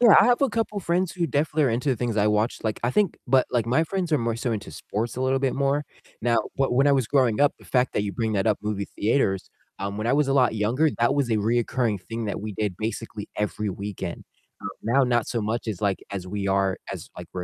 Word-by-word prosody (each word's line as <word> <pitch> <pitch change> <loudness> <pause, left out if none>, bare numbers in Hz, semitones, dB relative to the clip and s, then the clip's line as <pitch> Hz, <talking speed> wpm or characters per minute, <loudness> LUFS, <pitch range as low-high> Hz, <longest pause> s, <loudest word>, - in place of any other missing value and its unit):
Yeah, 235 -4 +8
I - - +6
have 245 +2 +3
a 275 - +4
couple 215 -2 -2
friends 175 0 0
who 175 -2 -1
definitely 150 +1 +1
are 125 - +2
into 120 +5 -1
the 130 - +2
things 115 -1 -2
I 105 0 +3
watch. 105 +2 +1
Like, 110 -1 -1
I 120 - +1
think, 205 +3 +2
but, 130 0 +4
like, 120 -2 +1
my 130 +7 +3
friends 185 0 -2
are 150 - +4
more 115 -1 -1
so 120 +2 -2
into 110 -3 -4
sports 115 +3 -4
a - - -3
little 130 +1 +2
bit 135 -1 0
more. 140 +1 +1 0.4
Now, 115 0 +2 0.2
but, 135 -2 +1
when 135 +3 +4
I - - +5
was 135 -4 +2
growing 125 -3 +2
up, 145 - +5
the - - -18
fact 125 0 +1
that - - 0
you 100 -1 -3
bring 115 -2 -1
that 100 -1 0
up, 105 -2 +2
movie 105 -2 -2
theaters, 105 -4 +1 0.3
um, 100 +1 -3
when 110 +1 -2
I - - +3
was 145 +1 +3
a - - +2
lot 125 -4 +3
younger, 120 +9 +2
that 120 +3 +3
was 140 -4 0
a 110 - +3
reoccurring 115 0 0
thing 115 +4 -5
that 105 - -3
we 105 +1 -5
did 105 -2 -2
basically 110 -1 -4
every 105 0 -1
weekend. 100 +1 -5 0.4
Uh, - - -10 0.2
now 130 +5 +3
not 120 -2 +1
so 120 - -1
much 110 +2 -2
as, 105 -4 -3
like, 100 -2 +1
as 95 -3 -4
we 100 +1 -3
are 95 -1 +1
as, - - -7
like, 90 -1 -8
we're 90 - -4
115 Hz, 265 wpm, -25 LUFS, 105-135 Hz, 0.4 s, Yeah